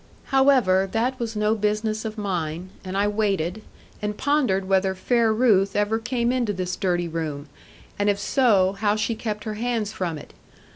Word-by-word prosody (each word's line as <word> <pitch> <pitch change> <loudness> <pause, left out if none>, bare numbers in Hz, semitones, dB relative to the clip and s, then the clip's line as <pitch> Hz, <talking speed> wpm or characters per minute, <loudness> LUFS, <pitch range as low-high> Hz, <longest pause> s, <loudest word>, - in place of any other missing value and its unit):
However, 250 -9 +4
that 250 +4 0
was 225 -2 -3
no 210 +1 +2
business 215 +1 -1
of 220 0 -5
mine, 180 -3 -3
and 190 0 -4
I 200 +1 +2
waited, 205 -2 -1 0.4
and 210 0 -3
pondered 255 -10 +1
whether 190 0 +2
fair 230 +4 +2
Ruth 210 -4 +3
ever 205 +2 +1
came 240 0 0
into 240 -5 0
this 180 -1 -3
dirty 175 -3 0
room, 155 -3 -4 0.5
and 205 0 +2
if 200 - +2
so, 200 -4 +3
how 210 -1 +2
she 215 +2 -1
kept 215 -2 -4
her 215 - -4
hands 230 -4 -1
from 170 -4 -3
it. 145 - -12
210 Hz, 175 wpm, -24 LUFS, 190-225 Hz, 0.5 s, However